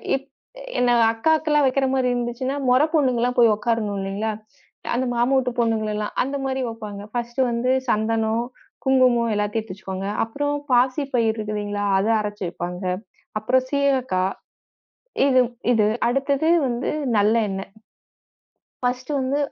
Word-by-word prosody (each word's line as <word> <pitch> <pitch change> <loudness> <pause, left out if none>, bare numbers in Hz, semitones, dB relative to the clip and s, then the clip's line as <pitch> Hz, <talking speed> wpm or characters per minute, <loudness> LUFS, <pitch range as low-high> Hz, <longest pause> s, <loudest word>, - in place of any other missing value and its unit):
இப் 275 +1 -6 0.5
என்ன 245 -1 +3 0.2
அக்காக்கெல்லாம் 300 +4 +2
வைக்கிற 270 +1 +1
மாதிரி 260 -1 +1
இருந்துச்சுன்னா 245 +3 -2
மொறப் 295 +6 +3
பொண்ணுங்க 255 -7 +2
எல்லாம் 250 +1 0
போய் 230 -3 +6
உட்காரணும் 215 -2 -1
இல்லைங்களா, 200 +3 -2 0.6
அந்த 260 +1 0
மாமா 245 +3 +2
ஊட்டுப் 250 -1 -3
பொண்ணுங்களல்லாம். 215 -2 -1
அந்த 275 +2 -4
மாதிரி 265 0 -1
வைப்பாங்க. 210 -3 -7
ஃபர்ஸ்ட் 240 +1 -4
வந்து 235 +2 0 0.2
சந்தனம், 220 +1 +1 0.4
குங்குமம் 250 -3 +3
எல்லாத்தையும் 210 +2 -1
எடுத்து 185 -4 -9
வச்சுக்வாங்க. 190 0 -5 0.2
அப்புறம் 290 +6 -2 0.2
பாசிப்பயிர் 250 -2 +2
இருக்கு 215 0 -4
இல்லீங்களா, 205 0 -3
அதை 205 +4 +1
அரைச்சு 210 -1 -4
வைப்பாங்க. 180 +2 -5 0.6
அப்புறம் 255 +4 +1
சீயக்காய் 260 -10 +1 0.9
இது 255 -1 +4 0.3
இது. 215 -2 +3 0.2
அடுத்தது 275 +4 +1 0.2
வந்து 240 0 -2 0.3
நல்ல 210 +2 +4 0.2
எண்ணெ. 195 0 -3 1.2
ஃபர்ஸ்ட் 250 +2 -2
வந்து 265 +2 0
235 Hz, 130 wpm, -23 LUFS, 215-260 Hz, 1.2 s, போய்